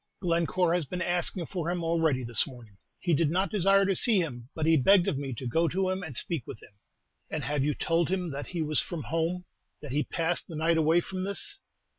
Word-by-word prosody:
"Glencore 170 0 +1
has 175 -3 0
been 175 +5 -4
asking 175 0 0
for 170 -1 -4
him 175 -1 -2
already 165 -5 +1
this 120 +3 +2
morning. 120 -7 -13 0.2
He 175 - 0
did 155 0 +2
not 190 +4 0
desire 195 -1 +4
to 195 0 +1
see 225 +3 +4
him, 125 -8 -4
but 155 - -1
he 160 0 +5
begged 180 +6 +5
of - - +1
me 140 -2 -4
to 130 - -7
go 165 +8 +1
to 185 +2 0
him 185 0 -3
and 155 -9 -4
speak 160 -9 -2
with - - -8
him." - - -17 0.6
"And - - -3
have 145 -1 0
you 150 +1 0
told 165 -1 0
him 180 -3 -1
that 140 +1 -5
he 170 -3 -3
was 155 0 +3
from 165 -4 -6
home, 165 +2 -2 0.3
that 150 - -8
he 145 +3 +1
passed 165 +1 -1
the 165 - -8
night 165 +2 +2
away 160 +2 +3
from 185 +1 -5
this?" 200 - -2
165 Hz, 235 wpm, -28 LUFS, 150-180 Hz, 0.6 s, he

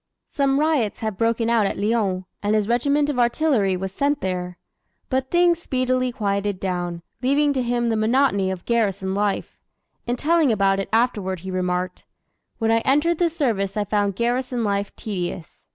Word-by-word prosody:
Some 275 -1 +1
riots 295 -9 +1
had 220 -2 -2
broken 230 +2 +1
out 230 -3 +3
at - - -3
Lyons, 200 -3 0 0.2
and 210 +1 +1
his 210 -1 +1
regiment 280 +5 +2
of 285 -4 -1
artillery 240 -6 +2
was 190 +1 -4
sent 285 +8 0
there. 180 -1 -3 0.5
But 260 0 -1
things 345 -1 +3
speedily 255 -3 0
quieted 200 -3 -1
down, 175 -2 -3 0.2
leaving 285 +3 +2
to 260 - 0
him 240 -1 0
the 225 - +1
monotony 220 -3 +2
of 185 -2 -5
garrison 200 -5 0
life. 205 0 -2 0.5
In 240 - 0
telling 315 +1 +2
about 195 -2 +2
it 195 - -3
afterward 210 -6 0
he 190 +1 -6
remarked: 180 0 -2 0.5
"When 225 -1 +1
I 225 - +4
entered 295 +7 +2
the 345 -1 +3
service 220 - -1
I 210 - +1
found 205 -1 0
garrison 245 +2 -1
life 200 -1 -1
tedious. 180 -5 -6
225 Hz, 170 wpm, -22 LUFS, 195-260 Hz, 0.5 s, I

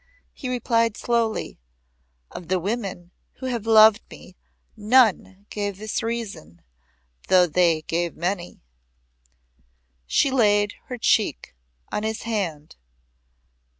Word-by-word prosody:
He 260 - -6
replied 230 -3 0
slowly; 230 - -1 0.7
"Of 175 - -9
the 185 +1 0
women 195 -3 -4 0.2
who 260 - -10
have 235 -4 -3
loved 220 -1 +7
me 180 - -14 0.4
none 210 -3 +2
gave 205 -2 -3
this 215 +1 -3
reason, 205 - -6 0.6
though 185 -1 +5
they 165 -1 +2
gave 170 +2 -2
many." 175 - -4 1.4
She 275 - +2
laid 205 -4 +2
her 250 - -6
cheek 220 - 0 0.4
on - - -2
his 220 +1 -3
hand. 175 - -4
210 Hz, 110 wpm, -23 LUFS, 180-230 Hz, 1.4 s, loved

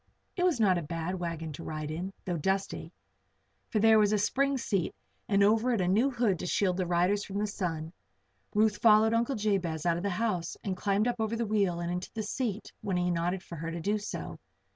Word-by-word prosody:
It 360 - -2
was 345 -9 +2
not 190 -5 +4
a - - -4
bad 170 +3 -3
wagon 165 -2 -4
to 165 - -8
ride 155 -1 -4
in, 180 +5 -4
though 180 - -1
dusty; 190 +5 -1 0.8
for 220 - -1
there 220 +1 +6
was 210 -1 +4
a 215 - +3
spring 275 +7 +1
seat 195 -8 -1 0.3
and 200 -1 +4
over 225 +4 +3
it 225 - +1
a 180 - +1
new 220 +9 +3
hood 235 -8 +1
to - - -4
shield 185 -1 +1
the 185 -2 -1
riders 180 +4 +2
from 195 - -5
the 210 - +1
sun. 170 -6 -3 0.6
Ruth 215 0 +3
followed 220 0 +5
Uncle 235 +4 +1
Jabez 190 -7 -1
out 170 -1 +2
of 175 - -4
the 200 - 0
house 185 -3 -1
and 190 -2 -2
climbed 200 +4 +1
up 240 0 0
over 220 +1 0
the 230 0 -1
wheel 200 -5 +1
and 170 0 -2
into 180 +1 -3
the 220 - -2
seat 215 -1 -3
when 195 -4 -1
he 180 0 +1
nodded 175 +2 -1
for 170 - -9
her 165 +2 -4
to 170 +1 -4
do 205 +5 0
so. 205 - -6
195 Hz, 230 wpm, -30 LUFS, 175-215 Hz, 0.8 s, there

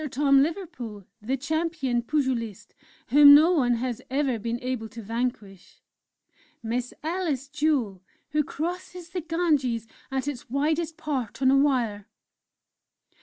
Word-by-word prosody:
Tom 275 +1 +4
Liverpool, 260 - -4 0.2
the 255 +6 -1
Champion 295 -3 -1
Pugilist, 240 -6 -2 0.4
whom 285 0 +9
no 315 +4 +6
one 250 -8 +3
has 245 0 -3
ever 265 -3 0
been 235 +2 -3
able 250 -3 -4
to 230 +2 -10
vanquish! 220 -4 -5 0.8
"Miss 240 +2 -2
Alice 315 -5 -2
Jewel, 285 - 0 0.3
who 300 +1 +2
crosses 345 +3 -5
the 360 - -4
Ganges 300 -9 0 0.2
at 270 0 -2
its 265 -6 -5
widest 310 +4 0
part 260 -8 -3
on 260 - +5
a - - +5
Wire!"... 240 -7 +1
270 Hz, 125 wpm, -26 LUFS, 235-305 Hz, 0.8 s, whom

